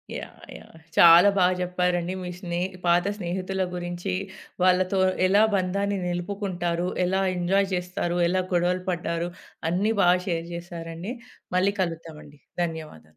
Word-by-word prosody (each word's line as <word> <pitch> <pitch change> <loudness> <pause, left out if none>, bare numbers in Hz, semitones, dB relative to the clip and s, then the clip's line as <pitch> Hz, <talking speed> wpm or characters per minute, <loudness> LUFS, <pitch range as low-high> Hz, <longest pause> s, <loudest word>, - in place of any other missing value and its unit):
Yeah! - - -9
Yeah! - - -16 0.2
చాలా 170 +3 +9
బా 185 - +5 0.2
చెప్పారండి. 180 0 0
మీ 180 - -5
స్నేహ 175 0 -2 0.2
పాత 175 +1 +3
స్నేహితుల 190 0 -3
గురించి 175 +1 -4 0.5
వాళ్ళతో 185 +1 +3 0.3
ఎలా 200 +3 +5
బంధాన్ని 200 +2 0
నిలుపుకుంటారు? 175 -1 -2 0.2
ఎలా 190 +2 +1 0.2
ఎంజాయ్ 195 +3 +2
చేస్తారు? 180 -1 -2
ఎలా 185 +1 +1
గొడవలు 180 +1 +1
పడ్డారు? 170 -1 -2 0.4
అన్నీ 200 +6 +1
బాగా 180 -1 +5
షేర్ 170 -2 -2
జేశారండి. 170 +3 -6 0.4
మళ్ళీ 195 +2 +2
కలుద్దామండి. 160 -4 -6 0.2
ధన్యవాదాలు. 155 - -7
180 Hz, 125 wpm, -25 LUFS, 170-185 Hz, 0.5 s, చాలా